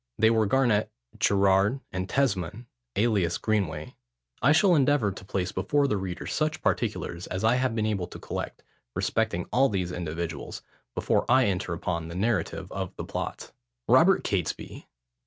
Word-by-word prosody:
They 110 +1 +5
were 110 -2 +3
Garnet, 115 -2 +2 0.3
Gerrard, 100 +4 +3
and 95 0 -3
Tesmond, 110 -4 0 0.3
alias 100 -6 +2
Greenway. 90 -8 -1 0.5
I 135 - +5
shall 180 +4 +5
endeavour 140 -8 +3
to 95 - -10
place 95 -1 -2
before 140 +10 +1
the 105 - 0
reader 95 -2 -5
such 155 +1 -1
particulars 85 +1 -1
as 95 +3 -4
I 110 +2 +4
have 130 -2 0
been 110 -2 0
able 100 -5 -1
to - - -10
collect - - -6 0.3
respecting - - 0
all 135 +3 +4
these 90 -3 -1
individuals, 85 -2 -5 0.3
before - - +1
I 130 -1 +6
enter 95 -2 -1
upon 85 -1 -3
the 85 - -7
narrative 100 -2 -1
of - - -4
the - - -5
plot. - - -5 0.4
ROBERT - - +5
CATESBY. - - -3
100 Hz, 155 wpm, -27 LUFS, 90-120 Hz, 0.5 s, I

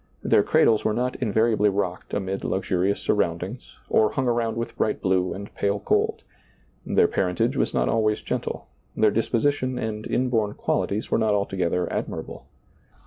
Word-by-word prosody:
Their - - +4
cradles 110 -2 +3
were 110 - +1
not 125 +1 -1
invariably 110 -2 +2
rocked 95 -2 -3
amid 95 0 -3
luxurious 95 +1 0
sur - - +1
roundings 95 +4 -3
or 110 - +3
hung 130 -2 0
around 115 -2 0
with 115 - -4
bright 110 - 0
blue 95 -1 +1
and 100 +1 -7
pale 100 0 0
gold; - - 0 0.6
their - - +3
parentage 90 -2 0
was - - +1
not 60 0 +1
always 110 - +1
gentle, - - -3 0.3
their 110 - +4
disposition 130 +3 0
and 110 -1 -4
inborn 115 -5 0
qualities 105 +3 -1
were - - +3
not 110 -2 +2
alto 100 -1 -1
gether 90 -1 0
admirable. - - -5
105 Hz, 160 wpm, -24 LUFS, 95-115 Hz, 0.6 s, Their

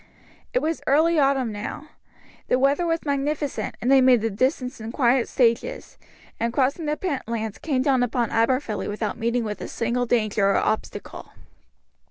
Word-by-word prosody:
It - - 0
was 320 +1 -1
early 315 +3 +4
autumn 270 -4 +2
now; 235 +9 -6 0.6
the 250 - +2
weather 280 +6 +2
was 330 0 -1
magnificent, 285 0 -2
and 250 - 0
they 270 -1 +7
made 255 -3 +5
the 225 0 -1
distance 250 +2 -1
in 220 +1 -5
quiet 245 -1 +2
stages, 255 - 0 0.4
and 230 0 0
crossing 275 +6 0
the 300 0 -1
Pentlands 230 - -3
came 270 -5 0
down 265 -3 +2
upon 245 -1 0
Aberfilly 230 -2 0
without 210 +2 -3
meeting 235 +1 0
with 210 -1 -5
a - - -5
single 240 +1 -1
danger 215 -4 +2
or 200 - +2
obstacle. 215 - -3
255 Hz, 165 wpm, -24 LUFS, 230-285 Hz, 0.6 s, they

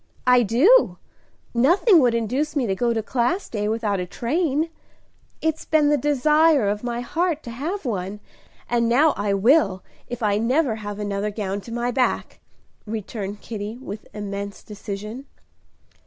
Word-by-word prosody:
"I 250 -1 +6
do! 275 - +4 0.6
Nothing 340 - +5
would 245 -4 +3
induce 255 +7 -1
me 275 -4 +1
to 195 - 0
go 235 +5 0
to 225 -1 -1
Class 265 - 0
Day 210 -2 -2
without 215 -3 -1
a 180 - -3
train. 310 - -1 0.7
It's 320 0 0
been 305 -2 +3
the 295 - +4
desire 295 -1 +3
of 205 +2 -1
my 240 0 -2
heart 325 +5 -1
to 235 - -7
have 310 - -4
one, 200 -3 -3 0.5
and 235 -1 +1
now 290 +6 +5
I 205 -1 0
will, 195 - +3 0.2
if 245 -1 -6
I 205 -1 +2
never 250 +1 +1
have 205 -1 -6
another 205 0 -2
gown 205 -1 -3
to 230 - -11
my 240 +1 -1
back!" 255 0 -1 0.5
returned 210 -1 -5
Kitty, 215 0 -6
with 215 -5 -8
immense 200 -1 -6
decision. 210 +5 -7
235 Hz, 155 wpm, -23 LUFS, 210-290 Hz, 0.7 s, I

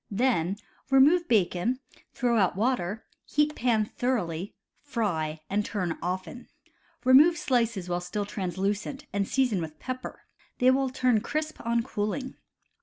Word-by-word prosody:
Then 200 -5 +1 0.3
remove 295 +6 +5
bacon, 215 +3 +1 0.3
throw 240 -1 0
out 190 -3 +2
water, 215 -2 -1 0.2
heat 300 +1 +1
pan 230 -3 +2
thoroughly, 205 -8 -2 0.3
fry, 170 - -2
and 205 +2 0
turn 180 -6 -2
often. 185 +7 -4 0.6
Remove 295 +7 +7
slices 230 - 0
while 175 0 -1
still 200 +4 -3
translucent, 205 - -3
and 200 -1 0
season 250 -9 +1
with 155 -1 -6
pepper. 255 +8 -6 0.3
They 255 +1 +5
will 265 0 +1
turn 250 -3 +2
crisp 310 +4 -3
on 235 0 +1
cooling. 255 +3 -3
225 Hz, 130 wpm, -27 LUFS, 185-260 Hz, 0.6 s, Remove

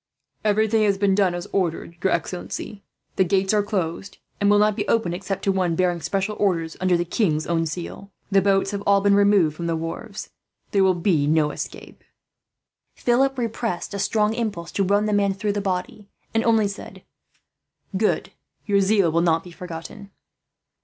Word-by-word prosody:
"Everything 215 +1 +2
has 200 -2 +2
been 195 -1 +2
done 190 -3 +2
as 175 - -5
ordered, 170 -2 -1
your 190 - +2
excellency. 195 +3 -4 0.4
The 190 - +5
gates 190 +2 +1
are 210 - +4
closed, 195 -2 -3 0.2
and 200 - +3
will 205 - +5
not 210 0 +3
be 205 0 -3
opened 220 -7 +1
except 195 +2 -4
to 195 - +2
one 185 -3 0
bearing 175 -1 +1
special 195 +4 -2
orders, 165 -5 0
under 185 -1 +3
the 175 - -1
king's 165 -4 0
own 165 -1 0
seal. 175 +4 -7 0.2
The 195 0 +5
boats 195 0 +2
have 200 -1 -3
all 200 0 +5
been 200 0 +4
removed 200 -6 +4
from 170 +1 -4
the 165 - 0
wharves. 165 +6 -6 0.4
There 200 -1 +3
will 190 -1 +4
be 170 -5 +1
no 150 -1 +2
escape." - - -8 0.9
Philip 270 +3 +2
repressed 230 -5 -3
a 200 - -3
strong 210 +1 +1
impulse 205 -8 -3
to 200 - 0
run 200 +2 +2
the 210 - 0
man 200 -1 +2
through 205 +1 -1
the 205 - -2
body, 195 +2 -4 0.2
and 225 0 +2
only 225 -3 +3
said: 200 +1 -9 0.9
"Good. 210 +3 0 0.3
Your 200 -2 +3
zeal 195 -3 +3
will 170 +1 +2
not 165 -1 +2
be 180 - -11
forgotten." 175 +3 -9
195 Hz, 185 wpm, -23 LUFS, 175-205 Hz, 0.9 s, The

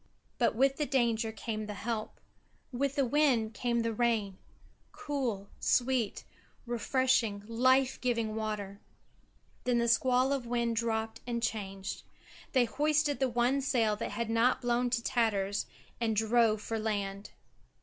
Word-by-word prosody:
But 235 -3 +2
with 270 +3 +3
the 295 - -1
danger 230 -4 +1
came 215 0 -5
the 210 - -5
help; 220 +1 -4 0.5
with 275 +2 -1
the 275 - +2
wind 250 -5 +2
came 235 +2 0
the 230 0 -1
rain; 215 -4 0 0.5
cool, 245 -9 -3
sweet, 245 -4 +1 0.4
refreshing, 240 -3 +1
life 255 +4 +2
giving 230 -3 0
water. 210 -2 -4 0.8
Then 245 -1 +1
the 235 0 +1
squall 255 +3 +3
of 260 -4 -3
wind 235 -1 0
dropped 225 -1 -1
and 235 -1 -2
changed. 195 -3 -3 0.5
They 255 -3 +4
hoisted 295 +4 +1
the 265 -1 +2
one 245 +3 +1
sail 230 -6 +1
that 230 - -3
had 225 +2 -3
not 230 +3 +3
blown 245 0 +1
to 235 -1 -1
tatters, 205 -5 0 0.3
and 225 -2 0
drove 220 0 +3
for 225 -1 -3
land. 200 -2 -3
235 Hz, 140 wpm, -31 LUFS, 220-255 Hz, 0.8 s, They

